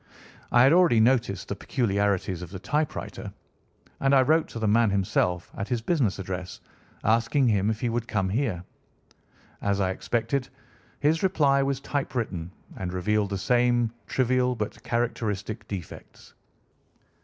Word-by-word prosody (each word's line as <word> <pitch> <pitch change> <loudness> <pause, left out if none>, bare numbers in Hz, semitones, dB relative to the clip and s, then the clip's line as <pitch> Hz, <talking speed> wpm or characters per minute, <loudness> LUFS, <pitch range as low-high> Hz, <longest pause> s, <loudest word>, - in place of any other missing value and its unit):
I 120 - +6
had 135 +4 +6
already 170 -10 +5
noticed 115 -5 +2
the 100 - -3
peculiarities 100 -5 0
of 90 - -7
the 95 - -7
typewriter, 150 - -3 0.7
and 135 0 +3
I 130 - +6
wrote 160 +4 +3
to - - -8
the 110 -1 -1
man 115 +1 +4
himself 90 -2 0
at 100 - -4
his 120 -3 -2
business 130 - +1
address 90 -1 -5 0.4
asking 115 +5 +2
him 100 -1 +2
if 110 -1 -2
he 120 - 0
would 115 0 -2
come 95 -5 0
here. 105 -5 -1 1.0
As 100 0 0
I 95 -1 +1
expected, 120 +6 -1 0.5
his 155 +2 +2
reply 145 -7 +3
was 135 -1 0
typewritten 115 - -3 0.3
and 90 -1 -4
revealed 100 +3 0
the 100 - -2
same 120 +2 +2
trivial 125 0 +1
but 105 -2 -5
characteristic 115 -2 -2
defects. 95 -4 -9
115 Hz, 145 wpm, -26 LUFS, 100-130 Hz, 1.0 s, I